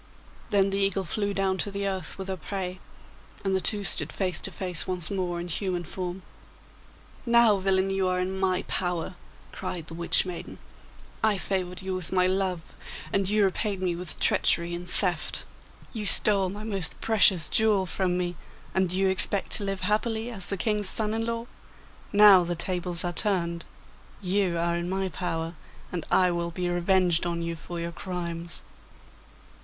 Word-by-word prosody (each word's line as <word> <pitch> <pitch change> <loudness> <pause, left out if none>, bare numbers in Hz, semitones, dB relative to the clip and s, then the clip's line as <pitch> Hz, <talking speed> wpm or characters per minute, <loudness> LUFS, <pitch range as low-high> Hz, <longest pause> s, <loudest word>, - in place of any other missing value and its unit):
Then 195 -1 +3
the 195 - 0
eagle 195 -1 +1
flew 205 +3 -1
down 195 -1 0
to - - 0
the 200 0 -3
earth 190 -3 -3
with 190 -1 -5
her 190 - -2
prey, 185 +1 -5 0.7
and 190 0 +2
the 190 - +1
two 205 +1 +3
stood - - +1
face 185 -4 0
to - - -2
face 180 -4 0
once 180 -2 0
more 180 -3 -2
in 175 - -5
human 180 +1 -1
form. 180 +2 -5 1.0
'Now, 235 -3 +5
villain, 190 0 +2
you 195 -1 +1
are 180 0 0
in 190 +1 -2
my 185 -1 +1
power!' 180 -1 -1 0.4
cried 170 -3 -4
the 165 - -6
Witch 170 +2 +2
maiden. 180 -2 -7 0.7
'I 215 -2 +3
favoured 185 -1 -2
you 190 0 -3
with 185 -3 -2
my 185 -1 +3
love, 185 -3 -1 0.4
and 195 -1 +1
you 210 0 +3
repaid 195 +1 0
me 180 -2 0
with 175 -1 +1
treachery 170 0 +3
and 175 +1 -6
theft. 180 -4 -1 0.5
You 215 -3 -1
stole 195 -3 +4
my 205 +3 -7
most 200 -5 -1
precious 200 -7 +4
jewel 215 -3 +3
from 180 0 -1
me, 175 -1 -2 0.4
and 190 -1 +2
do 180 - -3
you 190 +1 +2
expect 190 +1 +1
to 210 - -2
live 195 -1 -3
happily 220 +4 0
as 190 -6 -7
the 200 - -2
King's 210 0 0
son 215 -1 +1
in 225 0 -1
law? 230 0 -2 0.7
Now 205 -3 +8
the 175 0 -2
tables 175 0 -1
are 175 -1 -2
turned; 170 -3 0 0.5
you 185 -2 0
are 170 0 0
in 170 +1 -3
my 190 0 -1
power, 165 -1 -3 0.4
and 175 -3 -3
I 180 -1 +4
will 170 0 -1
be 180 +1 -3
revenged 175 -1 +2
on 170 -1 -2
you 170 0 -3
for 170 +2 -7
your 170 0 -3
crimes. 170 -2 -5
185 Hz, 180 wpm, -27 LUFS, 175-195 Hz, 1.0 s, Now